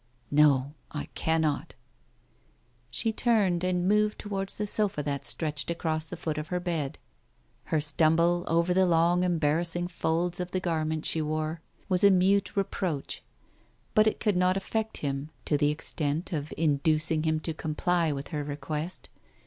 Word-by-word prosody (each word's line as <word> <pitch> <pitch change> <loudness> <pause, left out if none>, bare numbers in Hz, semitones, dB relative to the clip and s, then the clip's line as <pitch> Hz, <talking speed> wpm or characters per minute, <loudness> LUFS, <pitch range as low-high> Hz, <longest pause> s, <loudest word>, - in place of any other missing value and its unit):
"No, 145 -2 +4 0.2
I 145 - -5
cannot." 160 -2 0 1.1
She 220 - -1
turned, 205 -8 +2
and 180 -1 +1
moved 210 +1 +3
towards 195 -2 -4
the 210 - -2
sofa 205 -7 -1
that 140 -1 -3
stretched 150 -2 -2
across 160 -2 -1
the - - -7
foot 155 -2 -3
of 150 - -5
her 180 +1 -1
bed. 165 -6 -2 0.7
Her 155 - +1
stumble 165 +4 +2
over 170 +2 +2
the 190 0 +4
long 170 +1 +3
embarrassing 170 +1 0
folds 170 +1 0
of 180 0 -3
the 185 - -1
garment 160 -3 -1
she 160 - +1
wore 155 +1 -2 0.3
was 185 -1 +1
a 200 - +9
mute 195 +2 +3
reproach, 185 -6 -2 0.7
but 215 0 +5
it 215 - +1
could 210 -3 +1
not 180 +1 +3
affect 220 +3 -2
him, 140 +1 -2 0.2
to 150 - +1
the 145 0 +3
extent 150 +2 -2
of 150 -1 -3
inducing 155 +1 +2
him 155 0 +1
to 160 - -2
comply 160 +2 0
with 140 -1 -5
her 150 -2 -2
request. 150 +4 -5
165 Hz, 155 wpm, -28 LUFS, 150-180 Hz, 1.1 s, a